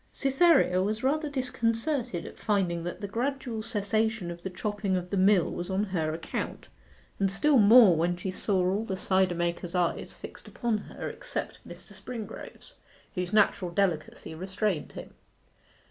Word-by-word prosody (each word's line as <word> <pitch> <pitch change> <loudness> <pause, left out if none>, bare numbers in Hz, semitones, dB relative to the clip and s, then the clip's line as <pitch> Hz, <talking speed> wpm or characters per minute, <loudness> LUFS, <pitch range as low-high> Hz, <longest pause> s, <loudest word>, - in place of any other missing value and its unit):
Cytherea 270 - +3
was 215 +4 -2
rather 300 +3 +1
disconcerted 250 - -1
at - - -10
finding 185 -5 0
that 175 - -5
the 200 - -3
gradual 240 +1 -2
cessation 215 -2 -1
of 170 0 -9
the 190 - -4
chopping 200 0 -2
of 180 0 -5
the - - 0
mill 190 -2 +4
was 175 - -5
on 190 +2 +1
her 170 -6 -1
account, 160 +1 -5 0.5
and 195 -1 +2
still 270 +8 +3
more 215 -3 +8
when 175 +2 0
she 185 +1 -4
saw 185 -1 +1
all 195 +4 0
the 190 -4 -4
cider 185 -1 +2
makers' 175 +1 -2
eyes 175 -2 0
fixed - - -11
upon 235 -3 -1
her - - -7
except - - -5
Mr. - - -12
Springrove's, 230 -4 -8 0.4
whose 180 -3 -3
natural 200 -3 +3
delicacy 170 -4 -1
restrained 190 0 -2
him. - - -9
195 Hz, 160 wpm, -28 LUFS, 180-225 Hz, 0.5 s, more